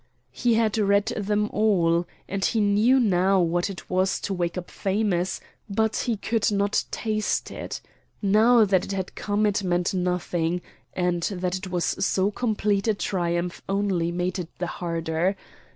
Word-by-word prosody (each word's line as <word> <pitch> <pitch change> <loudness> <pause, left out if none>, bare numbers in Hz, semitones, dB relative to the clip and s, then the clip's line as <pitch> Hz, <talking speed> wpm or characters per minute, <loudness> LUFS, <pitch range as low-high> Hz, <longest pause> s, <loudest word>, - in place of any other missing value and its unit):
He 240 -2 +1
had 220 -1 +1
read 200 0 +3
them 210 0 0
all, 175 -5 +2 0.2
and 195 0 -3
he 225 - +1
knew 215 +5 +4
now 195 -4 +3
what 175 +2 +1
it 185 -4 -8
was 185 +1 +1
to 200 - -2
wake 175 -1 -2
up 180 - -6
famous, 195 -3 0 0.3
but 220 +2 +1
he 235 -3 -1
could 220 +1 0
not 200 0 +1
taste 215 -2 -1
it. - - -6 0.4
Now 220 +3 +5
that 190 -2 +2
it - - -4
had 190 -2 -3
come 205 +1 0
it 205 -1 +1
meant 175 0 0
nothing, 180 -1 -1 0.3
and 180 -1 0
that 180 0 -1
it 185 0 -5
was 175 -1 -1
so 190 +1 +1
complete 210 -2 0
a 220 - +3
triumph 175 -2 -2
only 195 -4 0
made 175 +1 -2
it 170 -2 -5
the 180 - -2
harder. 165 +1 -1
195 Hz, 165 wpm, -25 LUFS, 180-210 Hz, 0.4 s, Now